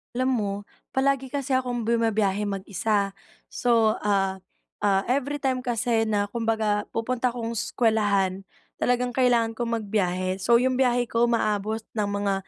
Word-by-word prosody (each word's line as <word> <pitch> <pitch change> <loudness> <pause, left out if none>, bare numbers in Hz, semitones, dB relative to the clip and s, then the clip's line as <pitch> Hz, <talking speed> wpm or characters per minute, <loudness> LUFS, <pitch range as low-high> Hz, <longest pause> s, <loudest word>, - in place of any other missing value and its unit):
Alam 255 +1 +1
mo, 200 -1 -1 0.4
palagi 270 0 +1
kasi 275 -1 -2
akong 245 -3 0
bumabiyahe 220 -3 +1
mag-isa, 200 +1 -1 0.4
So, 230 -3 +2
ah, 195 -2 +1 0.4
ah, 195 -2 +3
everytime 270 0 0
kasi 230 -1 +1
na 205 -1 +1
kumbaga 220 -2 0
pupunta 250 +2 0
akong 230 -2 -4
eskuwelahan, 205 -5 +1 0.4
talagang 245 0 +1
kailangan 240 -3 +2
kong 235 -1 -2
magbiyahe. 185 -3 -1
So 235 +5 +4
'yong 255 0 +1
biyahe 245 -2 +2
ko 230 +1 +3
umaabot 220 -2 0 0.2
ng 205 -1 0
mga 200 -1 0
225 Hz, 135 wpm, -25 LUFS, 205-245 Hz, 0.4 s, So